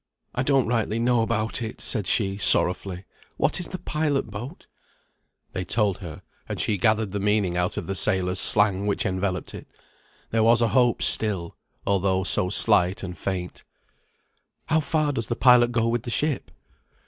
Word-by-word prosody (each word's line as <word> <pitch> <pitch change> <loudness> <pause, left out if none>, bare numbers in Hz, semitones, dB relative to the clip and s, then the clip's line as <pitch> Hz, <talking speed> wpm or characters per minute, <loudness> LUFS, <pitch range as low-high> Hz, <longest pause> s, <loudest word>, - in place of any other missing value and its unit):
"I 125 - -2
don't 135 -1 +1
rightly 115 -2 -2
know 120 0 +1
about 110 +1 -2
it," 110 -1 -7
said 105 -7 -1
she, 100 -2 0
sorrowfully. 90 -1 +6 0.3
"What - - -1
is 175 - -5
the 185 - -7
pilot 150 -8 -3
boat?" 115 +7 -9 0.9
They 95 - -4
told 100 -1 -1
her, 85 -6 -10 0.3
and - - -5
she 105 -3 -1
gathered 110 0 0
the 100 - -4
meaning 100 -3 0
out 90 0 -2
of - - -4
the 95 - -4
sailors' 95 -1 0
slang 100 -1 +1
which 100 - -2
enveloped 95 -1 -3
it. - - -11 0.6
There 115 - 0
was 115 +1 +3
a 115 -1 +1
hope 120 0 +1
still, 95 -6 +2 0.3
although 95 -1 0
so 90 0 +2
slight 95 -3 +2
and 90 -2 -7
faint. 90 +1 -6 1.1
"How 160 0 +2
far 155 -1 -1
does 115 -5 -4
the 120 - -3
pilot 125 -1 +4
go 115 -1 0
with 115 0 -1
the 120 - -8
ship?" 150 +4 -2
105 Hz, 170 wpm, -23 LUFS, 95-120 Hz, 1.1 s, sorrowfully